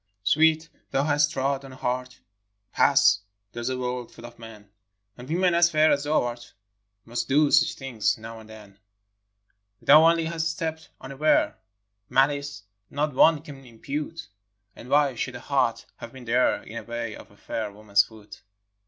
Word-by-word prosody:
OWEET, 160 +5 +3 0.2
thou 135 - 0
hast 145 0 +2
trod 135 0 -1
on 135 -1 -11
a - - -11
heart, 125 0 -4 0.5
^ - - -50
Pass! 100 - +4 0.3
there's 120 +3 -4
a 130 - -2
world 125 -1 -4
full 115 - -13
of 120 0 -13
men; 110 -3 -12 0.5
And 125 +3 -12
women 180 +2 +2
as 170 0 +4
fair 155 -1 +3
as 145 0 0
thou 155 +1 +2
art 120 0 -7 0.5
Must 120 +1 -4
do 145 +2 +3
such - - +4
things 110 -6 -1
now 115 0 -9
and 110 0 -15
then. 105 -2 -14 1.0
Thou 155 +2 +7
only 165 -1 +1
hast 165 0 -2
stepped 160 0 -5
unaware, 135 +4 +1 0.3
— 105 +1 -52
Malice, 140 -4 0 0.3
not 150 +1 -2
one 155 +3 +4
can 140 -4 -11
impute; 145 +7 -6 0.5
And 125 - -12
why 145 -1 +3
should 125 +1 -4
a - - -7
heart 130 -3 0
have 115 - -10
been 130 -2 -11
there 120 +2 +1
In 115 - -9
the 115 - -6
way 115 -1 -5
of - - -13
a 100 - -22
fair 110 -1 -5
woman's 100 0 +2
foot? 110 -2 -15
130 Hz, 180 wpm, -25 LUFS, 115-150 Hz, 1.0 s, Thou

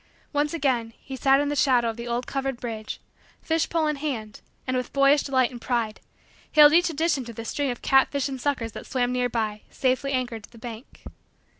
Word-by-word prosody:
Once 295 +1 +1
again, 260 -8 0
he 265 - -8
sat 270 +1 +4
in 290 0 0
the 290 - -1
shadow 250 -4 +3
of 225 - -2
the 235 +1 -7
old 240 +1 -2
covered 270 -2 -2
bridge, 220 -3 -5 0.4
fish 325 0 0
pole 330 -2 +1
in 300 -1 0
hand, 240 -8 -4 0.2
and, 255 - -1
with 250 -1 -2
boyish 275 +1 +5
delight 260 -3 +1
and 240 -2 -9
pride, 230 -4 -1 0.5
hailed 300 0 +8
each 350 +1 +5
addition 315 -3 0
to 235 -1 -9
the 230 +1 -7
string 285 +4 -1
of 245 - -5
catfish 270 +1 +3
and 265 -2 -6
suckers 250 -5 -1
that - - -9
swam 250 -1 0
near 250 0 0
by, 215 -3 -2
safely 260 +1 0
anchored 245 -4 -2
to - - -13
the 235 - -15
bank. 230 +2 -10
255 Hz, 210 wpm, -25 LUFS, 235-285 Hz, 0.5 s, hailed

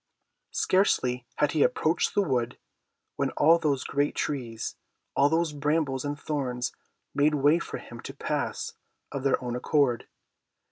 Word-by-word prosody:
Scarcely 125 -10 +2
had 150 -1 +2
he 155 - +1
approached 175 - +2
the 205 - +4
wood, 125 -8 -1 0.6
when - - +1
all 165 +2 +6
those 145 -5 +1
great 145 +1 0
trees, 120 -6 -3 0.4
all 140 +1 +5
those 160 0 +1
brambles 145 -2 0
and 145 0 -3
thorns 125 -5 -2 0.4
made 150 +1 +3
way 145 +4 +4
for - - -5
him - - -10
to - - -8
pass - - -2 0.4
of 140 - -3
their 135 -1 +2
own 120 -1 -2
accord. 125 -1 +1
145 Hz, 145 wpm, -28 LUFS, 130-155 Hz, 0.6 s, all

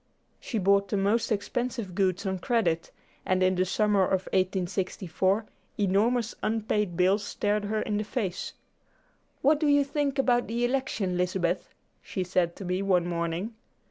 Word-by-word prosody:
She 230 - -4
bought 200 0 +3
the 200 - -1
most 210 +5 +1
expensive 225 0 -2
goods 190 +1 0
on 190 -1 -1
credit, 175 -8 0 0.3
and 185 0 +1
in 185 0 +4
the 185 0 +1
summer 205 +1 +2
of 190 0 +1
1864 185 +1 0 0.3
enormous 215 +4 +2
unpaid 210 -4 -1
bills 190 +3 +3
stared 205 0 -1
her 215 +1 -1
in 210 -2 -1
the 210 - -1
face. 200 -4 -3 0.9
"What 290 +2 +4
do 305 - +1
you 285 0 +5
think 280 0 -1
about 245 -2 +2
the 235 +2 0
election, 240 -8 -1
Lizabeth?" 180 0 -1 0.3
she 185 - -3
said 180 -1 0
to 195 - -8
me 180 +1 -1
one 185 -3 +2
morning. 170 +5 -2
200 Hz, 155 wpm, -28 LUFS, 185-225 Hz, 0.9 s, you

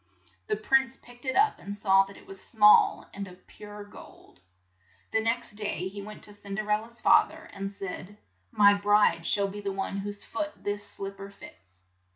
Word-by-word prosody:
The - - +1
prince 265 +5 +2
picked 245 +2 -17
it 260 - -1
up 425 +1 +3
and 200 +1 -6
saw 195 -1 +4
that 195 0 -13
it - - -16
was 195 0 -7
small 210 -2 +5
and 200 0 -6
of 180 0 -15
pure 205 0 -11
gold. 205 - -15 0.7
The 220 - +2
next 225 +1 0
day 205 -4 -3
he 200 +1 -8
went 210 +1 -10
to 205 - -6
Cin 200 -1 -8
der 215 +1 -3
el 210 0 +3
la's 235 +1 -11
fa - - +6
ther - - -13
and 195 0 -5
said, 195 0 -7 0.3
"My 205 - +6
bride 205 -4 +3
shall 200 -1 +2
be 205 +1 -7
the 200 -1 -2
one 195 0 -3
whose 205 +1 -3
foot 300 +6 -4
this 205 0 -2
slip 195 -1 -5
per 195 0 -8
fits." 90 - -16
205 Hz, 200 wpm, -28 LUFS, 195-215 Hz, 0.7 s, fa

